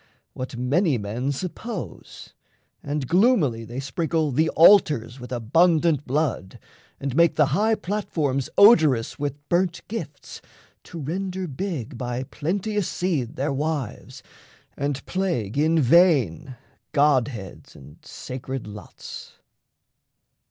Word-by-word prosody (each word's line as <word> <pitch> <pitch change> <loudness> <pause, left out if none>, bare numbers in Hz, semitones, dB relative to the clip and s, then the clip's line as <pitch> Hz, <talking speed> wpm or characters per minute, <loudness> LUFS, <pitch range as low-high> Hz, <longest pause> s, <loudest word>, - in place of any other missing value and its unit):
What 130 -1 -6
many 140 +4 +1
men 115 +6 -3
suppose; 185 - -7 0.5
and 145 -2 -3
gloomily 170 - +2
They 120 +4 -6
sprinkle 155 +3 -1
the 155 +5 +2
altars 150 - +4
with 125 +1 -10
abundant 155 +5 +2
blood, 135 -8 -2 0.4
And 135 -2 -4
make 170 +1 +4
the 150 - +4
high 220 +2 +2
platforms 155 -10 -2
odorous 155 - +5
with 145 0 -5
burnt 175 0 0
gifts, 225 +2 -7 0.4
To 175 - -10
render 185 +5 -3
big 140 - -5
by 125 0 -3
plenteous 195 +8 -2
seed 155 -8 -2
their 140 +1 -1
wives 145 -4 -4 0.5
And 140 -1 -3
plague 170 - -2
in 160 +3 +2
vain 135 - +3 0.4
godheads 130 - 0
and 70 +2 -14
sacred 130 0 -7
lots. 105 0 -10
145 Hz, 110 wpm, -24 LUFS, 125-175 Hz, 0.5 s, odorous